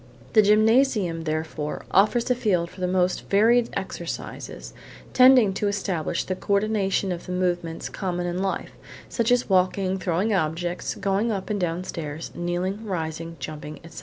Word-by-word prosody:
The 215 - +7
gymnasium, 215 -5 +3
therefore, 155 -1 -3
offers 215 +6 +3
a - - +6
field 185 -8 0
for 185 - -12
the 180 - +1
most 180 0 0
varied 230 +4 +4
exercises, 190 -3 -6 0.4
tending 250 -6 +6
to 205 - -1
establish 190 -5 -1
the 185 - -3
co 200 - -2
ordination 200 -2 +1
of 175 -1 -5
the - - -5
movements 175 -2 -1
common 180 -2 -3
in 175 +1 -2
life, 195 0 -2 0.4
such 235 0 0
as 245 0 +3
walking, 190 0 +1
throwing 185 +5 0
objects, 175 0 -1
going 200 +4 0
up 200 0 -3
and 205 - -1
down 175 +1 -1
stairs, 155 -3 -6
kneeling, 180 +4 -2
rising, 165 -4 -4
jumping, 150 -1 -7
etc. 165 - -10
185 Hz, 160 wpm, -25 LUFS, 170-210 Hz, 0.4 s, The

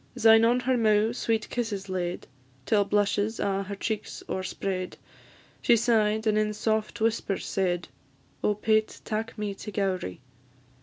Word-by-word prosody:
Syne 225 -2 +6
on 245 +2 +3
her 255 0 +1
mou' 215 0 +3
sweet 225 -2 -1
kisses 210 -5 -2
laid, 180 -2 -3 0.4
Till 205 +3 +3
blushes 205 +2 +1
a' 195 -1 0
her 200 +1 -5
cheeks 215 +1 -4
o'erspread; 185 0 -3 0.6
She 235 - +5
sigh'd, 220 -1 +2
and 215 -1 +3
in 210 0 0
soft 220 +1 -1
whispers 220 -3 0
said, 175 -3 -1 0.6
"Oh, 210 - +2
Pate, 215 +1 +1
tak 225 +1 -3
me 210 -1 -2
to 210 +2 -8
Gowrie!" 190 - -2
210 Hz, 145 wpm, -27 LUFS, 195-225 Hz, 0.6 s, Syne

